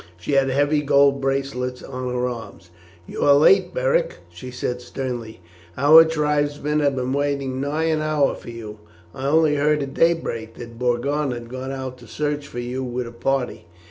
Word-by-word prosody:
She 90 - -5
had 135 -1 +3
heavy 145 +3 +2
gold 140 -1 +3
bracelets 135 -2 -2
on 130 -1 -5
her 125 0 -1
arms. 115 -7 -8 0.3
"You - - -7
are 140 - +6
late, 185 +6 +5
Beric," - - 0 0.2
she 130 - -9
said 125 0 -4
sternly. 120 -4 -6 0.4
"Our 155 +4 +8
tribesmen 150 -1 0
have 140 -2 +1
been 130 0 -2
waiting 140 -2 -1
nigh 145 +3 -1
an 160 -1 +1
hour 155 -2 +1
for - - -10
you. 110 -2 -8 0.3
I 135 +1 -4
only 155 0 +3
heard 150 0 +2
at 135 0 -7
daybreak 115 -10 0
that 115 -1 -10
Borgon 135 +4 0
had 120 -1 -8
gone 130 +1 -5
out 130 -1 -6
to 120 - -14
search 145 +1 -3
for 120 - -10
you 125 +2 -3
with 125 0 -3
a 115 - -8
party." 125 -5 -2
135 Hz, 180 wpm, -22 LUFS, 125-150 Hz, 0.4 s, Our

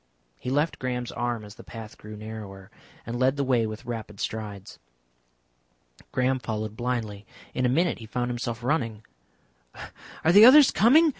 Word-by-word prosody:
He - - -5
left 145 +5 0
Graham's 125 -1 -3
arm 120 -2 -3
as 105 - -11
the - - -13
path 110 -2 -9
grew 105 0 -10
narrower, 105 -3 -9 0.3
and 120 +2 -4
led 130 +1 +3
the 140 - +1
way 125 -4 +2
with 110 0 -7
rapid 110 -4 -6
strides. 105 -3 -5 1.3
Graham 130 +1 +1
followed 110 -2 -4
blindly. 115 -4 -3 0.3
In 125 -1 +1
a - - +1
minute 165 +3 +1
he 110 - -10
found 125 +1 -2
himself 120 -1 -4
running. 115 -6 -1 1.2
"Are 160 - +6
the 205 +4 +9
others 270 +4 +9
coming?" 300 +10 +5
120 Hz, 160 wpm, -26 LUFS, 110-130 Hz, 1.3 s, the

